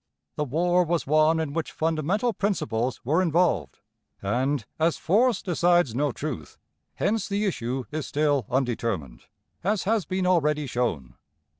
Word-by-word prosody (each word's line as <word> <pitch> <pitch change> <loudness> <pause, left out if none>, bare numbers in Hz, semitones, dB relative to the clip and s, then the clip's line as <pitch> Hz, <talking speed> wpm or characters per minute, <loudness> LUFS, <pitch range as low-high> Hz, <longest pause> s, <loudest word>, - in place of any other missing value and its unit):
The 150 - -1
war 175 +6 +2
was 170 0 -1
one 155 +2 +3
in 155 -3 -2
which 165 0 -2
fundamental 165 +9 0
principles 130 - -1
were 155 +8 +2
involved; 165 - +1 0.4
and, 125 +5 -1
as 165 +1 +2
force 230 +7 +2
decides 175 - +2
no 145 +3 +1
truth, 125 - -6 0.4
hence 215 -1 0
the 205 +1 0
issue 130 - -2
is 150 -3 -3
still 145 -6 +1
undetermined, 115 - -2 0.4
as 205 +2 +1
has 215 -1 +1
been 185 0 -1
already 150 -4 +2
shown. 115 - -2
155 Hz, 140 wpm, -26 LUFS, 125-180 Hz, 0.4 s, one